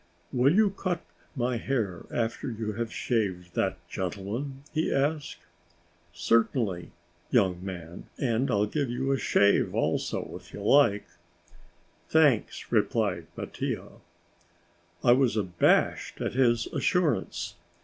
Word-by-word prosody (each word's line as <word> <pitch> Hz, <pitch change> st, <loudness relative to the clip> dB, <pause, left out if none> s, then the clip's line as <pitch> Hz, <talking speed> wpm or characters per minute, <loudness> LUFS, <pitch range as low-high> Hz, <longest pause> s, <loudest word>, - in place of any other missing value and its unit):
"Will 130 Hz, +6 st, +4 dB
you 210 Hz, -1 st, +4 dB
cut 185 Hz, -3 st, -3 dB, 0.3 s
my 125 Hz, -2 st, 0 dB
hair 110 Hz, -8 st, -2 dB
after 115 Hz, +2 st, -2 dB
you 110 Hz, -2 st, -3 dB
have 115 Hz, +1 st, -3 dB
shaved 95 Hz, -7 st, -1 dB
that 95 Hz, +1 st, 0 dB
gentleman?" 105 Hz, +11 st, -4 dB
he 160 Hz, 0 st, 0 dB
asked. 145 Hz, +2 st, -1 dB, 0.7 s
"Certainly, 100 Hz, 0 st, +1 dB, 0.4 s
young 95 Hz, -7 st, +2 dB
man, 85 Hz, -3 st, -7 dB
and 125 Hz, 0 st, 0 dB
I'll 105 Hz, 0 st, +2 dB
give 140 Hz, +5 st, -1 dB
you 130 Hz, +3 st, -1 dB
a 135 Hz, -, +1 dB
shave 100 Hz, 0 st, +3 dB
also, -, -, -1 dB
if -, -, -12 dB
you 105 Hz, -, -7 dB
like." 110 Hz, -4 st, +4 dB, 1.0 s
"Thanks," 150 Hz, -8 st, +2 dB
replied -, -, +1 dB
Mattia. -, -, -4 dB, 1.1 s
I 120 Hz, -, +6 dB
was 125 Hz, -3 st, +3 dB
abashed 90 Hz, -4 st, +2 dB
at -, -, -2 dB
his 120 Hz, -3 st, +3 dB
assurance. 175 Hz, -9 st, 0 dB
120 Hz, 120 wpm, -28 LUFS, 100-135 Hz, 1.1 s, I